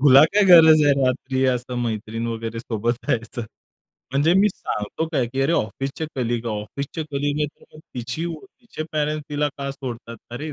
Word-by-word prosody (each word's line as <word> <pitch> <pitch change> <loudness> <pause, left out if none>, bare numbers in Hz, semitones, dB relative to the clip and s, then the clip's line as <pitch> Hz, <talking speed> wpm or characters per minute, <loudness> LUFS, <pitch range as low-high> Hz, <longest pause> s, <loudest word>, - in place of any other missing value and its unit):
"तुला 135 -1 +8
काय 205 +6 +3
गरज 160 -4 +8
आहे 145 - +5
रात्री 130 +1 0
असं 125 0 -1
मैत्रीण 115 0 -3
वगैरे 115 0 -4
सोबत 115 0 -1
जायचं?" 115 +1 -1 0.7
म्हणजे 145 +5 +3
मी 210 +2 +5
सांगतो 105 - -4
काय 130 -5 +1
की 135 +3 -3
अरे, 150 - +2
ऑफिसचे 135 +3 -2
कलीग, 120 -2 -1
ऑफिसचे 115 +8 -4
कलीग 145 +1 -1
आहे, 150 - +2
तर - - -18
मग 155 - -12
तिची 125 +6 -4
व 170 - -3
तिचे 220 -4 -9
पॅरेंट्स 150 0 -1
तिला 150 0 +1
का 140 0 -3
सोडतात, 120 -4 -7
अरे 150 +6 -5
135 Hz, 175 wpm, -23 LUFS, 120-155 Hz, 0.7 s, तुला